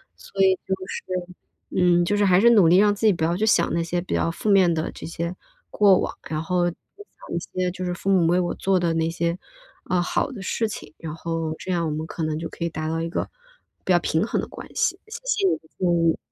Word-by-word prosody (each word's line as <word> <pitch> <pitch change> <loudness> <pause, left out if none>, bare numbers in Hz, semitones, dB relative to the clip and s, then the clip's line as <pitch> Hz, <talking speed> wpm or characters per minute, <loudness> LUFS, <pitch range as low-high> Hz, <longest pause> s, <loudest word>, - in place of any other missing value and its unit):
所 195 - -2
以 190 0 +6
就 190 - +1
是 - - -5 0.7
嗯， 175 -1 +4
就 205 - +1
是 205 - +2
还 185 -2 +5
是 235 +4 +6
努 205 -7 +6
力 175 +3 +6
让 205 +1 +5
自 210 +2 +1
己 210 - +5
不 165 -2 -3
要 170 +2 +2
去 215 +3 0
想 210 - +3
那 170 - +1
些 175 +1 -1
比 180 - -5
较 - - +1
负 190 +5 -3
面 190 -3 +5
的 160 -1 -2
这 - - -9
些 170 +2 -4 0.4
过 200 -3 +5
往， - - -3
然 155 0 -2
后 175 +1 +1
就 170 - -9 0.2
想 410 - -10
一 - - 0 0.2
些 180 - 0
就 185 +1 -6
是 180 -1 -2
父 195 +2 -1
母 180 -4 +4
为 175 +2 +3
我 175 -1 -1
做 195 -1 +1
的 170 -2 +1
那 165 0 +1
些， 170 +1 -1 0.5
呃， 180 -1 +2
好 175 - 0
的 205 - -8
事 225 +4 -1
情， 155 -7 -8
然 160 -2 -6
后 165 -1 -3
这 185 - -5
样 170 -2 0
我 155 - -1
们 155 +1 -3
可 165 - -5
能 155 -1 -1
就 165 - -5
可 170 - -5
以 - - -1
达 155 -1 -4
到 165 0 -1
一 165 - -2
个， - - -3 0.6
比 185 - +3
较 175 - +5
平 160 +3 0
衡 - - 0
的 - - -6
关 - - -10
系， - - +1
谢 435 +2 -7
谢 410 -6 +2
你 - - +2
的 - - -29 0.2
建 185 - 0 0.2
议。 165 - +2
175 Hz, 285 characters per minute, -24 LUFS, 165-195 Hz, 0.7 s, 以